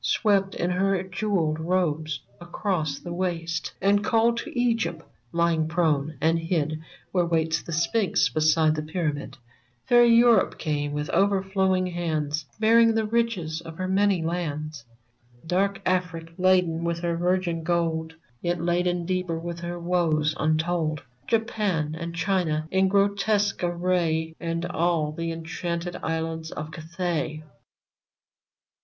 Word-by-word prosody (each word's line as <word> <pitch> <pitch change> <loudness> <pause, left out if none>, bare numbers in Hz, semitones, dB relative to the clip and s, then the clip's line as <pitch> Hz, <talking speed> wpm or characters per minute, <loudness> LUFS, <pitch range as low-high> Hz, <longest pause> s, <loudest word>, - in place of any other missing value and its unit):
Swept 195 -3 +2
in 175 - -1
her 190 0 +1
jewelled 185 -5 -1
robes 160 -4 -1 0.2
across 175 -4 -2
the 175 +3 -7
waste, 170 -2 -2
And 205 +1 +3
called 230 +2 +3
to 245 - -4
Egypt 230 -9 0 0.3
lying 170 -2 +1
prone 155 -3 0
and 165 +3 +2
hid 155 -2 -1 0.3
Where 180 -2 +2
waits 160 -1 +1
the - - -9
Sphinx 170 -1 +2
beside 155 +3 +3
the 155 - -2
pyramid; 155 -3 -3 0.5
Fair 240 0 +6
Europe 235 0 +5
came 145 -2 -2
with 150 0 -3
overflowing 190 0 +2
hands, 155 -4 -2
Bearing 225 +1 +5
the 220 -1 +1
riches 210 -8 -1
of 165 -1 -10
her 185 - -2
many 195 -2 +2
lands; 155 -5 -3 0.6
Dark 195 +3 +1
Afric, 175 -3 -1
laden 180 -3 +2
with 170 0 -1
her 170 -1 0
virgin 175 -1 0
gold, 160 -1 -1 0.3
Yet 175 0 -1
laden 175 +1 0
deeper 180 -2 -1
with 170 +1 -5
her 175 0 -5
woes 165 -3 +1
untold; 155 0 0 0.2
Japan 210 -9 0
and 170 +1 -5
China 170 -4 0
in 190 0 +3
grotesque 200 +1 +1
array. 170 -2 0
And 165 0 -2
all 170 -3 0
the 165 +2 -3
enchanted 170 +1 -4
islands 160 0 -3
of 155 +1 -6
Cathay 160 -1 -3
170 Hz, 130 wpm, -25 LUFS, 160-185 Hz, 0.6 s, Fair